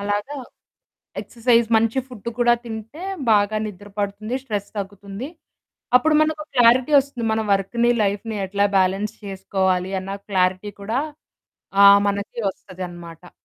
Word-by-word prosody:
అలాగ 205 Hz, 0 st, -1 dB, 1.0 s
ఎక్సర్సైజ్ 235 Hz, -1 st, +2 dB
మంచి 225 Hz, +3 st, +2 dB
ఫుడ్డు 235 Hz, -3 st, -7 dB
కూడా 240 Hz, 0 st, +5 dB
తింటే 225 Hz, -, -8 dB, 0.3 s
బాగా 210 Hz, +1 st, +3 dB
నిద్ర 205 Hz, 0 st, -9 dB
పడుతుంది. 205 Hz, +4 st, -3 dB
స్ట్రెస్ 205 Hz, -5 st, -4 dB
తగ్గుతుంది. 200 Hz, +4 st, -6 dB, 0.7 s
అప్పుడు 305 Hz, +4 st, +2 dB
మనకో 310 Hz, 0 st, 0 dB
క్లారిటీ 245 Hz, +4 st, +5 dB
వస్తుంది. 275 Hz, -4 st, -1 dB
మన 220 Hz, -, 0 dB
వర్క్‌ని, 235 Hz, +5 st, +1 dB
లైఫ్‌ని 205 Hz, +2 st, -2 dB
ఎట్లా 200 Hz, +1 st, +1 dB
బ్యాలెన్స్ 195 Hz, +3 st, +1 dB
చేసుకోవాలి? 190 Hz, -1 st, -1 dB
అన్న 195 Hz, +1 st, -5 dB
క్లారిటీ 185 Hz, +1 st, +1 dB
కూడా 225 Hz, +6 st, -1 dB, 0.8 s
ఆహ్, 200 Hz, 0 st, +9 dB
మనకి 200 Hz, +3 st, -4 dB
వస్తది 185 Hz, -1 st, -9 dB
అనమాట. 170 Hz, 0 st, -12 dB
205 Hz, 125 wpm, -22 LUFS, 195-235 Hz, 1.0 s, ఆహ్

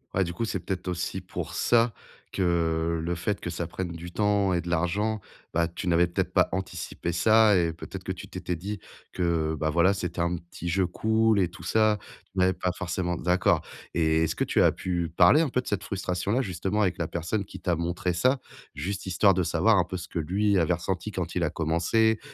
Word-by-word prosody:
Ouais, 95 Hz, -, +3 dB
du 85 Hz, 0 st, -4 dB
coup, 115 Hz, -, -3 dB
c'est 115 Hz, -, -2 dB
peut-être 95 Hz, -2 st, -4 dB
aussi 90 Hz, +1 st, -2 dB
pour 90 Hz, -, -6 dB
ça, 115 Hz, -1 st, +3 dB, 0.4 s
que, 95 Hz, -, -3 dB
heu, 85 Hz, -1 st, +1 dB
le 85 Hz, +2 st, -2 dB
fait 100 Hz, +4 st, -2 dB
que 85 Hz, -, -5 dB
ça 85 Hz, 0 st, -3 dB
prenne 90 Hz, 0 st, -4 dB
du 85 Hz, +1 st, -8 dB
temps 100 Hz, -1 st, +2 dB
et 85 Hz, -, +1 dB
de 85 Hz, -, -10 dB
l'argent, 100 Hz, +6 st, 0 dB, 0.3 s
bah, 85 Hz, 0 st, +2 dB
tu 90 Hz, +1 st, -6 dB
n'avais 85 Hz, +1 st, +4 dB
peut-être 85 Hz, -, -2 dB
pas -, -, +4 dB
anticipé 95 Hz, -2 st, -4 dB
ça 110 Hz, +4 st, +5 dB
et 85 Hz, -2 st, +2 dB
peut-être 80 Hz, -, -8 dB
que -, -, -3 dB
tu -, -, -7 dB
t'étais 90 Hz, -, -4 dB
dit 100 Hz, +4 st, -5 dB, 0.3 s
que, 85 Hz, -3 st, 0 dB
bah, 80 Hz, +1 st, -1 dB
voilà, 85 Hz, +4 st, +4 dB
c'était 90 Hz, -3 st, -4 dB
un 85 Hz, +1 st, +1 dB
petit 85 Hz, 0 st, -9 dB
jeu 95 Hz, +2 st, +2 dB
cool 110 Hz, +2 st, +2 dB
et 90 Hz, -, +3 dB
tout 85 Hz, -1 st, -13 dB
ça, 110 Hz, +3 st, +3 dB, 0.4 s
tu 95 Hz, -, -3 dB
n'avais 95 Hz, 0 st, +4 dB
pas 90 Hz, 0 st, -1 dB
forcément 90 Hz, -1 st, -2 dB
d'accord. 90 Hz, +3 st, +2 dB, 0.3 s
Et 80 Hz, -1 st, +3 dB
est-ce 80 Hz, -, -1 dB
que -, -, 0 dB
tu -, -, +2 dB
as -, -, +5 dB
pu 85 Hz, -3 st, -2 dB
parler 95 Hz, -, +6 dB
un 155 Hz, -, +1 dB
peu 125 Hz, -, 0 dB
de -, -, -16 dB
cette 100 Hz, -2 st, -1 dB
frustration-là 95 Hz, +5 st, -1 dB
justement, 95 Hz, 0 st, -1 dB
avec 95 Hz, -1 st, +1 dB
la 85 Hz, -, -1 dB
personne 85 Hz, +5 st, -2 dB
qui -, -, -10 dB
t'a 90 Hz, -2 st, 0 dB
montré 85 Hz, +2 st, -1 dB
ça, 130 Hz, +9 st, +2 dB, 0.4 s
juste 95 Hz, +7 st, -4 dB
histoire 95 Hz, +1 st, +4 dB
de 90 Hz, -, +1 dB
savoir 100 Hz, +6 st, +3 dB
un 90 Hz, -, +4 dB
peu 95 Hz, +1 st, -5 dB
ce 85 Hz, -, -7 dB
que -, -, -6 dB
lui 100 Hz, +5 st, +1 dB
avait 85 Hz, +1 st, +2 dB
ressenti 95 Hz, +4 st, -3 dB
quand 90 Hz, -3 st, -3 dB
il 90 Hz, -, +1 dB
a 75 Hz, -, +1 dB
commencé? 90 Hz, +8 st, +2 dB
90 Hz, 225 wpm, -27 LUFS, 85-100 Hz, 0.4 s, parler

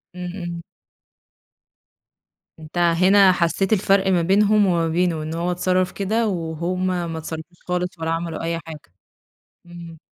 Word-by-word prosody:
إمم، 180 Hz, -1 st, -5 dB
إمم. 175 Hz, -2 st, -6 dB, 2.0 s
أنت 155 Hz, +2 st, -10 dB
هنا 185 Hz, +3 st, +5 dB
حسّيت 185 Hz, +3 st, +1 dB
الفرق 195 Hz, -1 st, +2 dB
ما 180 Hz, -3 st, +3 dB
بينهم 205 Hz, +4 st, +3 dB
وما 170 Hz, -3 st, +1 dB
بينه، 165 Hz, -1 st, 0 dB
إن 155 Hz, +1 st, -5 dB
هو 170 Hz, +2 st, -1 dB
اتصرّف 185 Hz, +1 st, 0 dB
كده، 220 Hz, +3 st, -1 dB
وهُم 175 Hz, +1 st, -2 dB
ما 175 Hz, -3 st, -2 dB
اتصرّفوش 160 Hz, +2 st, -8 dB
خالص 180 Hz, -1 st, -2 dB
ولا 160 Hz, 0 st, -2 dB
عملوا 165 Hz, 0 st, -3 dB
أي 165 Hz, 0 st, -2 dB
حاجة، 155 Hz, -, -11 dB, 0.7 s
إمم. 170 Hz, -1 st, -11 dB
175 Hz, 135 wpm, -22 LUFS, 165-185 Hz, 2.0 s, هنا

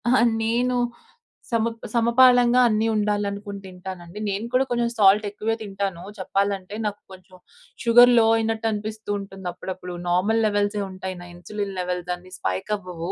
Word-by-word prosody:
అహా! 255 Hz, +2 st, +4 dB, 0.2 s
నేను 245 Hz, +3 st, +1 dB, 0.8 s
సమ 230 Hz, -1 st, +2 dB, 0.3 s
సమపాలంగా 245 Hz, +1 st, +5 dB
అన్ని 220 Hz, 0 st, +1 dB
ఉండాలనుకుని 205 Hz, -1 st, -2 dB
తింటానండి. 185 Hz, 0 st, -9 dB
నేను 200 Hz, +3 st, -2 dB
కూడా 260 Hz, +1 st, +3 dB
కొంచెం 240 Hz, -1 st, 0 dB
సాల్ట్ 205 Hz, 0 st, +5 dB
ఎక్కువే 215 Hz, +2 st, -2 dB
తింటాను. 195 Hz, -4 st, -4 dB, 0.2 s
చెప్పాలంటే, 195 Hz, +1 st, -1 dB
నాకు 205 Hz, -1 st, -3 dB
కొంచెం 185 Hz, 0 st, -14 dB, 0.5 s
షుగర్ 245 Hz, +1 st, +7 dB
లో 225 Hz, -, +5 dB
అయినట్టు 225 Hz, 0 st, -1 dB
అనిపిస్తూ 215 Hz, 0 st, -5 dB
ఉంటుంది 195 Hz, -1 st, -8 dB
అప్పుడప్పుడు. 180 Hz, 0 st, -7 dB, 0.2 s
నార్మల్ 195 Hz, +6 st, +2 dB
లెవెల్సే 205 Hz, 0 st, 0 dB
ఉంటాయి 185 Hz, 0 st, -6 dB
నా -, -, -10 dB
ఇన్సులిన్ 200 Hz, +3 st, -5 dB
లెవెల్స్ 180 Hz, 0 st, -3 dB
అన్ని 180 Hz, +1 st, -17 dB
స్పైక్ 95 Hz, -, -3 dB
అవ్వవు. 180 Hz, -2 st, -6 dB
205 Hz, 140 wpm, -24 LUFS, 185-225 Hz, 0.8 s, షుగర్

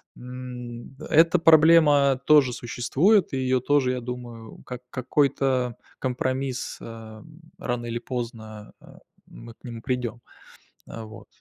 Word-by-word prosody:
М, 125 Hz, -1 st, -9 dB
д 145 Hz, -, -10 dB
эта 165 Hz, +3 st, +5 dB
проблема 150 Hz, -4 st, +5 dB
тоже 145 Hz, -5 st, +5 dB
существует, 145 Hz, -, +1 dB
и -, -, 0 dB
её 130 Hz, 0 st, +1 dB
тоже, 135 Hz, 0 st, +2 dB
я 125 Hz, -, -4 dB
думаю, 120 Hz, -2 st, -8 dB
как 125 Hz, -1 st, -7 dB
какой-то 130 Hz, -2 st, 0 dB, 0.2 s
компромисс, 130 Hz, 0 st, -3 dB
э, 110 Hz, -1 st, -10 dB, 0.3 s
рано 120 Hz, -1 st, -3 dB
или 115 Hz, 0 st, -3 dB
поздно, 115 Hz, -4 st, -7 dB
э, -, -, -19 dB, 0.4 s
мы 115 Hz, 0 st, -13 dB
к -, -, -41 dB
нему 115 Hz, -2 st, -8 dB
придём. 125 Hz, -2 st, -3 dB, 0.7 s
Э, 115 Hz, -, -8 dB
вот. 110 Hz, -1 st, -12 dB
125 Hz, 130 wpm, -25 LUFS, 120-135 Hz, 0.7 s, эта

